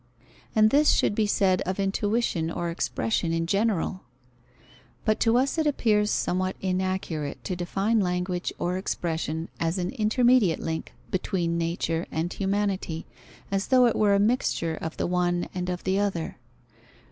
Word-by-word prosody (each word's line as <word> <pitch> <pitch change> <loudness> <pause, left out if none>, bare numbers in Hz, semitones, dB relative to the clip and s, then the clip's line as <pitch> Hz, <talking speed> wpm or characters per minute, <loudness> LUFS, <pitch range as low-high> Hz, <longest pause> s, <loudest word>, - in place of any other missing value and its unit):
And 215 0 +5
this 295 +2 +5
should - - +3
be 215 0 +1
said 190 -3 +2
of 185 +2 -3
intuition 195 -3 0
or 170 0 -3
expression 170 0 -1
in 165 0 0
general. 195 -1 0 1.0
But 215 -1 +2
to 230 +1 +3
us 275 +5 +1
it 310 - +2
appears 210 -7 +2
somewhat 185 -1 0
inaccurate 185 -5 -2
to 185 - -3
define 195 +6 0
language 180 -1 -1
or 180 +1 -1
expression 160 -3 -2
as 165 +2 0
an 180 -1 -2
intermediate 225 -4 +3
link 160 0 -4 0.2
between 180 -2 -1
nature 165 0 -1
and 165 +2 -2
humanity, 195 -4 -1 0.5
as 195 0 0
though 255 -1 +5
it 235 - +2
were 205 -2 +4
a - - +3
mixture 205 -7 +1
of 160 0 -5
the - - 0
one 175 0 0
and 180 0 -3
of 180 -1 -4
the 190 +1 +1
other. 190 -8 -2
185 Hz, 155 wpm, -26 LUFS, 170-210 Hz, 1.0 s, And